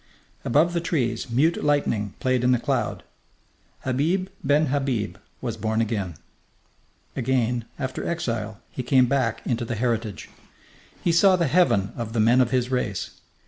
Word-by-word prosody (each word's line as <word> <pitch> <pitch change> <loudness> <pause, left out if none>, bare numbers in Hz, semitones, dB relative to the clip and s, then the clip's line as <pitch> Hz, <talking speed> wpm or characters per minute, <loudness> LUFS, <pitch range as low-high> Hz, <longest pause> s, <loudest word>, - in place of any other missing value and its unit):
Above 155 +7 +3
the 170 - 0
trees 125 -8 -1
mute 145 +8 +2
lightning 120 -9 0
played 130 -1 +1
in 125 - +4
the 125 - +4
cloud. - - -1 0.8
Habib 160 +9 0
ben 145 +3 +3
Habib 135 -6 -1 0.2
was - - -3
born 110 +1 -1
again. 105 -7 -1 1.0
Again, 125 -2 0
after 130 -2 -4
exile, 115 -11 -3
he - - -4
came 130 +1 +4
back 135 +1 0
into 120 -1 -1
the 115 0 -3
heritage. 115 -3 -2 0.8
He 170 - +3
saw 185 +3 +5
the 175 -2 +1
heaven 135 - +2
of 115 -2 -5
the 115 - 0
men 120 +4 +5
of 125 - +2
his 125 0 0
race. 110 -7 -3
125 Hz, 150 wpm, -24 LUFS, 115-145 Hz, 1.0 s, saw